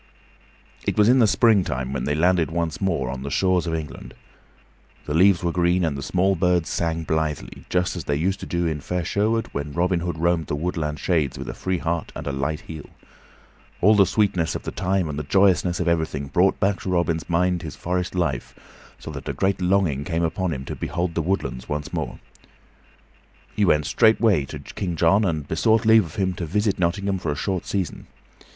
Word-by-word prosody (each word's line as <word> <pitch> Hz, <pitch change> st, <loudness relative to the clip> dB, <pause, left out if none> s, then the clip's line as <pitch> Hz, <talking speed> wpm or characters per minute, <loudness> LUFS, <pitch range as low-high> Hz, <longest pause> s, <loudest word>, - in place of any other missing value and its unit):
It -, -, -2 dB
was 105 Hz, 0 st, +5 dB
in 130 Hz, +2 st, +5 dB
the 115 Hz, -, +5 dB
springtime 85 Hz, -, +2 dB
when 70 Hz, -, -2 dB
they 75 Hz, -, 0 dB
landed 85 Hz, +1 st, +2 dB
once 85 Hz, 0 st, -2 dB
more 85 Hz, -10 st, 0 dB
on 65 Hz, 0 st, -6 dB
the 70 Hz, -, -4 dB
shores 90 Hz, +1 st, +1 dB
of 80 Hz, -, -1 dB
England. 75 Hz, -6 st, -7 dB, 0.9 s
The 75 Hz, -, -3 dB
leaves 90 Hz, +2 st, +4 dB
were 85 Hz, -, +1 dB
green 90 Hz, +1 st, +2 dB
and 80 Hz, -3 st, -1 dB
the 70 Hz, -, -5 dB
small 95 Hz, +6 st, +1 dB
birds 90 Hz, -1 st, +1 dB
sang 80 Hz, -1 st, -1 dB
blithely, 80 Hz, -2 st, -3 dB
just 90 Hz, 0 st, 0 dB
as 85 Hz, -, -5 dB
they 70 Hz, -, 0 dB
used 95 Hz, +7 st, 0 dB
to -, -, -7 dB
do 85 Hz, 0 st, -1 dB
in 80 Hz, -3 st, -2 dB
fair 90 Hz, +1 st, -3 dB
Sherwood 110 Hz, +5 st, +1 dB
when 70 Hz, 0 st, -4 dB
Robin 90 Hz, +2 st, +1 dB
Hood 85 Hz, -1 st, -3 dB
roamed 85 Hz, -1 st, +1 dB
the 75 Hz, -, -2 dB
woodland 75 Hz, -1 st, -2 dB
shades 80 Hz, -7 st, 0 dB
with -, -, -6 dB
a -, -, -4 dB
free 95 Hz, -1 st, -2 dB
heart 85 Hz, -1 st, -2 dB
and -, -, -6 dB
a 70 Hz, -, -2 dB
light 70 Hz, +3 st, -2 dB
heel. 80 Hz, -3 st, -9 dB, 0.9 s
All 105 Hz, +4 st, +5 dB
the 100 Hz, -3 st, +5 dB
sweetness 95 Hz, -6 st, +1 dB
of -, -, -5 dB
the -, -, -4 dB
time 95 Hz, -2 st, 0 dB
and 75 Hz, -1 st, -4 dB
the -, -, -3 dB
joyousness 95 Hz, +1 st, +3 dB
of 90 Hz, -, -1 dB
everything 80 Hz, -4 st, -1 dB
brought 95 Hz, +6 st, +2 dB
back 95 Hz, 0 st, +1 dB
to -, -, -5 dB
Robin's 85 Hz, -2 st, 0 dB
mind 90 Hz, +1 st, +1 dB
his 75 Hz, -3 st, -7 dB
forest 90 Hz, +1 st, -2 dB
life, 75 Hz, -9 st, -2 dB, 0.4 s
so -, -, -8 dB
that -, -, -7 dB
a -, -, -1 dB
great 95 Hz, 0 st, 0 dB
longing 90 Hz, -7 st, +1 dB
came 85 Hz, +1 st, -1 dB
upon 85 Hz, +2 st, -1 dB
him 65 Hz, -3 st, -5 dB
to -, -, -5 dB
behold 85 Hz, -1 st, -2 dB
the 85 Hz, -, 0 dB
woodlands 85 Hz, -7 st, -2 dB
once 75 Hz, +3 st, -4 dB
more. 80 Hz, -7 st, -3 dB
So -, -, -28 dB, 1.1 s
he 105 Hz, -, +2 dB
went 75 Hz, -4 st, +3 dB
straightway 110 Hz, -, +3 dB
to -, -, -7 dB
King 90 Hz, -4 st, -5 dB
John 85 Hz, +6 st, +3 dB
and 80 Hz, -6 st, -2 dB
besought 110 Hz, +8 st, +2 dB
leave 110 Hz, -2 st, +6 dB
of 80 Hz, -, -11 dB
him 95 Hz, -2 st, 0 dB
to 85 Hz, -, -3 dB
visit 105 Hz, +3 st, 0 dB
Nottingham 95 Hz, +2 st, 0 dB
for 85 Hz, -4 st, -2 dB
a -, -, -2 dB
short 95 Hz, +4 st, -3 dB
season. 95 Hz, -5 st, -3 dB
85 Hz, 210 wpm, -23 LUFS, 80-95 Hz, 1.1 s, leave